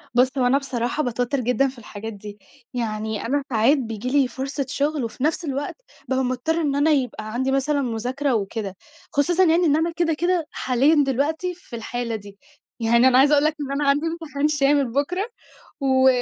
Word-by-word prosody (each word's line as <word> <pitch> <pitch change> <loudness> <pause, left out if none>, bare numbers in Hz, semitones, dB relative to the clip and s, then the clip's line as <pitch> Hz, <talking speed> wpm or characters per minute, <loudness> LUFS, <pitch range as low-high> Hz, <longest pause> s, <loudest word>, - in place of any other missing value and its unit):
بُص، 255 +2 +3
هو 255 - +2
أنا 265 +3 +4
بصراحة 260 +1 -2
باتوتّر 245 +3 -1
جدًا 250 +3 +2
في 260 - -8
الحاجات 220 -1 -8
دي، 205 0 -10 0.3
يعني 220 -3 -3
أنا 280 +4 0
ساعات 240 +5 +4
بييجي 225 -2 -4
لي 275 -1 +3
فرصة 270 +3 -4
شغْل، 285 0 -1
وفي 230 +3 -5
نفْس 320 +3 0
الوقت 280 0 -3 0.3
بابقى 265 0 +1
مضطرة 255 +7 -1
إن 285 -3 0
أنا 290 +3 +3
يبقى 245 -6 -1
عندي 260 +2 0
مثلًا 280 +2 +1
مذاكرة 255 +3 -1
وكده، 200 -1 -3 0.4
خصوصًا 335 +5 +3
يعني 345 0 +4
إن 295 -3 +4
أنا 325 +2 +1
كده، 340 -2 +1
كده 345 0 0
حاليًا 280 +4 +3
دلوقتي 310 +7 -1
في 335 -8 -11
الحالة 235 0 -3
دي. 200 -2 -10 0.4
يعني 235 +2 +4
أنا 255 -1 +5
عايزة 285 +2 +5
أقول 290 0 +4
لك 310 - +2
إن 275 -1 -4
أنا 280 0 +1
عندي 290 +3 +2
امتحان 320 -3 -2
شامل 285 -3 +2
بُكرة 345 - 0 0.6
و 265 -1 +4
270 Hz, 190 wpm, -23 LUFS, 240-295 Hz, 0.6 s, أنا